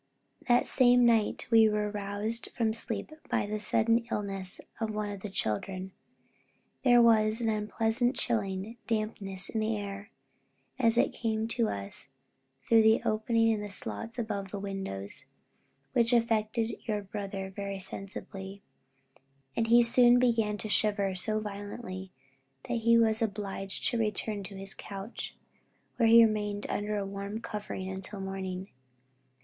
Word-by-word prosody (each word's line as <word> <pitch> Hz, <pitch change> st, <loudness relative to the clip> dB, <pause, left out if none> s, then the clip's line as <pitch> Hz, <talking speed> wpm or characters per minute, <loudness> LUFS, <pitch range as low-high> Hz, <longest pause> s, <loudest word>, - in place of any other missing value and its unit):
That 245 Hz, -1 st, +4 dB
same 245 Hz, -1 st, +5 dB
night 225 Hz, -3 st, +2 dB
we 225 Hz, -1 st, +7 dB
were 210 Hz, 0 st, -1 dB
roused 205 Hz, +3 st, -2 dB
from 225 Hz, -2 st, +2 dB
sleep 230 Hz, +6 st, -2 dB, 0.2 s
by -, -, +1 dB
the 210 Hz, +1 st, -3 dB
sudden 225 Hz, +2 st, +3 dB
illness 195 Hz, -3 st, -3 dB, 0.2 s
of 225 Hz, -2 st, -1 dB
one 210 Hz, -1 st, -3 dB
of 200 Hz, -, -6 dB
the 210 Hz, -, -6 dB
children. 185 Hz, -, -2 dB, 0.9 s
There 245 Hz, -2 st, +6 dB
was 220 Hz, -1 st, +4 dB
an 230 Hz, -2 st, +1 dB
unpleasant, 225 Hz, +4 st, 0 dB
chilling 210 Hz, -1 st, -1 dB
dampness 215 Hz, -4 st, -2 dB
in 220 Hz, -, -2 dB
the 215 Hz, 0 st, 0 dB
air, 200 Hz, 0 st, -6 dB, 0.7 s
as 230 Hz, -2 st, +3 dB
it -, -, +3 dB
came 220 Hz, -1 st, -1 dB
to 230 Hz, -1 st, +1 dB
us 100 Hz, +6 st, -6 dB, 0.5 s
through 225 Hz, -1 st, +5 dB
the 220 Hz, 0 st, +4 dB
openings 225 Hz, +1 st, +2 dB
in 210 Hz, -, -2 dB
the 205 Hz, -, -5 dB
sloats 185 Hz, -, -4 dB
above 205 Hz, -4 st, -3 dB
the 205 Hz, -, -5 dB
windows, 195 Hz, -, -5 dB, 0.7 s
which 235 Hz, 0 st, +3 dB
affected 225 Hz, -1 st, +1 dB
your 210 Hz, -2 st, -1 dB
brother 195 Hz, -1 st, -5 dB
very 200 Hz, -1 st, -4 dB
sensibly, 195 Hz, +1 st, -8 dB, 0.9 s
and 225 Hz, -, +1 dB
he 235 Hz, +1 st, +7 dB
soon 240 Hz, +1 st, +6 dB
began 225 Hz, -4 st, +2 dB
to 215 Hz, -, -5 dB
shiver 205 Hz, -2 st, +1 dB
so 215 Hz, +4 st, +1 dB
violently, 200 Hz, -2 st, -6 dB, 0.5 s
that 240 Hz, -, -2 dB
he 230 Hz, +1 st, +5 dB
was 225 Hz, 0 st, +3 dB
obliged 200 Hz, -2 st, -3 dB
to 240 Hz, -, -1 dB
return 210 Hz, -1 st, -1 dB
to 200 Hz, -, -9 dB
his 195 Hz, 0 st, +1 dB
couch, 200 Hz, +3 st, -7 dB, 0.6 s
where 230 Hz, -2 st, +4 dB
he 230 Hz, 0 st, +9 dB
remained 210 Hz, -1 st, -1 dB
under 210 Hz, 0 st, -1 dB
a 200 Hz, -, -2 dB
warm 200 Hz, +2 st, -5 dB
covering 210 Hz, -4 st, -5 dB
until 190 Hz, +2 st, -6 dB
morning. 190 Hz, 0 st, -5 dB
210 Hz, 145 wpm, -30 LUFS, 195-225 Hz, 0.9 s, he